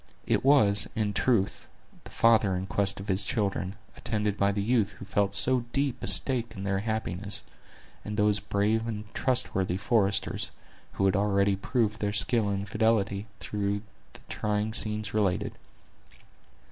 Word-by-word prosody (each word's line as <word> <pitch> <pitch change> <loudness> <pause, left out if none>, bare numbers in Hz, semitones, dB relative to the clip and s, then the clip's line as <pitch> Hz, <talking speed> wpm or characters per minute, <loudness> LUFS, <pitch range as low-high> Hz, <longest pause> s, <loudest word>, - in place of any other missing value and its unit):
It - - +1
was, 110 -8 +4
in 105 -2 0
truth, 105 -3 +1 0.4
the - - -9
father 110 -4 +3
in 90 +1 -3
quest 100 0 0
of 95 - -8
his 95 +1 +2
children, 100 -2 -1 0.2
attended 105 -2 -1
by 100 -1 +2
the 100 0 -1
youth 110 -3 +1
who 100 - -10
felt 100 0 0
so 125 +2 +2
deep 135 -2 0
a - - -4
stake 120 -4 +1
in 95 - -6
their 100 -1 0
happiness, 105 -2 -3 0.6
and 105 0 -5
those 105 -1 +3
brave 105 +3 0
and 105 -2 -4
trusty 95 -8 0
foresters, 105 -1 +1 0.4
who 95 - 0
had 95 - +3
already 100 0 +2
proved 110 +1 -1
their 105 0 -1
skill 110 +1 +2
and 100 0 -2
fidelity 100 -1 +1
through 100 0 -2 0.3
the - - -13
trying 105 +1 -1
scenes 105 -1 -1
related. 100 -1 0
105 Hz, 155 wpm, -28 LUFS, 100-110 Hz, 0.6 s, was